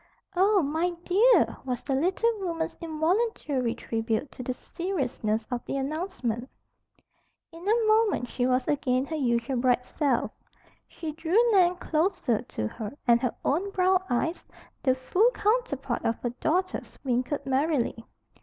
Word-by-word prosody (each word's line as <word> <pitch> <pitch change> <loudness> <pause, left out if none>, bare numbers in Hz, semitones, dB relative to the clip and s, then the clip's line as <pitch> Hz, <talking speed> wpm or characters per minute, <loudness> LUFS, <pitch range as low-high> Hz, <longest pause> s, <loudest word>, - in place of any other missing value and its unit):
"Oh, 390 0 +4
my 325 +5 0
dear!" 445 +7 +4
was 250 -2 -3
the 275 - -2
little 365 - +2
woman's 335 -4 -3
involuntary 315 - 0
tribute 225 +4 -2
to - - -9
the 250 - -2
seriousness 250 - -2
of 240 -1 -2
the - - -2
announcement. 270 - -3 1.0
In 330 0 -12
a 455 +1 +3
moment 430 - +3
she 245 +1 -1
was 255 0 +1
again 260 -3 +1
her 320 - -4
usual 250 -2 0
bright 250 0 +2
self. 275 -3 0 0.6
She 320 -2 -6
drew 325 +5 -1
Nan 365 -3 +5
closer 315 - 0
to 105 - -4
her 215 - -7
and 235 0 +5
her 250 - -1
own 350 +8 +1
brown 375 -1 +3
eyes, 320 +8 -1 0.4
the 260 -2 +3
full 365 - +3
counterpart 410 - 0
of 230 - 0
her 240 - 0
daughter's, 360 +9 -2
winkled 255 +2 -1
merrily. 270 -4 0
290 Hz, 145 wpm, -27 LUFS, 250-360 Hz, 1.0 s, Nan